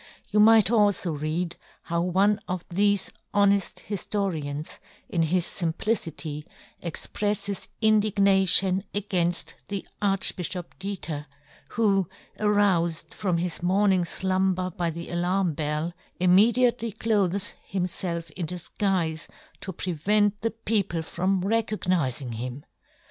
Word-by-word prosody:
You 210 Hz, -, +3 dB
might 220 Hz, -1 st, +6 dB
alfo 205 Hz, -5 st, +3 dB
read 165 Hz, +3 st, -2 dB, 0.3 s
how 170 Hz, 0 st, -1 dB
one 195 Hz, +4 st, +2 dB
of 180 Hz, -1 st, -4 dB
thefe 200 Hz, +2 st, +2 dB, 0.2 s
honeft 200 Hz, -1 st, +2 dB
hiftorians 170 Hz, -7 st, -3 dB, 0.3 s
in 170 Hz, -, 0 dB
his 170 Hz, +2 st, +1 dB
fimplicity 165 Hz, -4 st, -2 dB, 0.4 s
expreffes 205 Hz, +3 st, -2 dB, 0.2 s
indignation 195 Hz, -3 st, +4 dB
againft 180 Hz, -4 st, 0 dB
the 200 Hz, -1 st, -4 dB
Archbifhop 185 Hz, -3 st, +1 dB
Diether, 165 Hz, -7 st, -4 dB, 0.5 s
who, 195 Hz, -5 st, +2 dB, 0.3 s
aroufed 195 Hz, -6 st, +1 dB
from 185 Hz, -4 st, -1 dB
his 175 Hz, 0 st, -1 dB
morning 190 Hz, +1 st, +3 dB
flumber 185 Hz, 0 st, 0 dB
by 170 Hz, -1 st, 0 dB
the 170 Hz, +1 st, -6 dB
alarm 175 Hz, 0 st, +1 dB
bell, 150 Hz, +3 st, -2 dB, 0.3 s
immediately 230 Hz, +6 st, +4 dB
clothes 200 Hz, -3 st, 0 dB, 0.2 s
himfelf 175 Hz, -3 st, -2 dB
in 170 Hz, -1 st, -4 dB
difguife 175 Hz, -1 st, -2 dB, 0.3 s
to 190 Hz, -, -5 dB
prevent 200 Hz, +5 st, +1 dB
the 225 Hz, -, +1 dB
people 210 Hz, -7 st, -1 dB
from 185 Hz, +3 st, 0 dB
recognizing 180 Hz, -, 0 dB
him 125 Hz, +4 st, -6 dB
185 Hz, 105 wpm, -26 LUFS, 170-205 Hz, 0.5 s, might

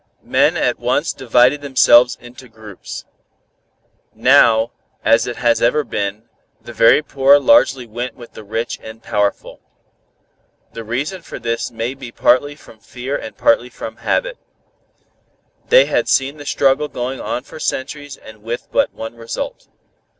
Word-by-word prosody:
Men -, -, +2 dB
at -, -, 0 dB
once -, -, 0 dB
divided 125 Hz, +4 st, +2 dB
themselves 125 Hz, -3 st, +4 dB
into 125 Hz, +1 st, -14 dB
groups. 110 Hz, -3 st, -10 dB, 1.1 s
Now, 110 Hz, 0 st, +4 dB, 0.3 s
as 115 Hz, -, +3 dB
it 120 Hz, -, -4 dB
has 120 Hz, -2 st, +1 dB
ever 150 Hz, +6 st, +2 dB
been, 105 Hz, -1 st, -4 dB, 0.3 s
the 120 Hz, -, -11 dB
very 115 Hz, +6 st, +5 dB
poor 140 Hz, -1 st, +4 dB
largely 145 Hz, -, +3 dB
went 120 Hz, +3 st, -6 dB
with 120 Hz, -2 st, -14 dB
the -, -, -11 dB
rich 110 Hz, +3 st, -4 dB
and 110 Hz, 0 st, -11 dB
powerful. 105 Hz, -1 st, -2 dB, 1.1 s
The 115 Hz, -, -7 dB
reason 140 Hz, -, -4 dB
for -, -, -9 dB
this 115 Hz, 0 st, -3 dB
may 115 Hz, +2 st, -4 dB
be 130 Hz, -3 st, -10 dB
partly 135 Hz, +5 st, +2 dB
from 115 Hz, -6 st, -17 dB
fear 130 Hz, +5 st, -6 dB
and 110 Hz, -, -7 dB
partly 120 Hz, +2 st, +2 dB
from 110 Hz, -2 st, -8 dB
habit. -, -, -2 dB, 1.3 s
They -, -, +7 dB
had -, -, -1 dB
seen 135 Hz, +2 st, +1 dB
the 145 Hz, -1 st, -10 dB
struggle 140 Hz, +2 st, +2 dB
going 130 Hz, -1 st, -5 dB
on 125 Hz, -, -3 dB
for 155 Hz, -, -12 dB
centuries 145 Hz, 0 st, -4 dB
and 110 Hz, -1 st, -15 dB
with 115 Hz, +2 st, -6 dB
but -, -, +1 dB
one 115 Hz, +1 st, -7 dB
result. 115 Hz, 0 st, -6 dB
120 Hz, 150 wpm, -18 LUFS, 115-140 Hz, 1.3 s, They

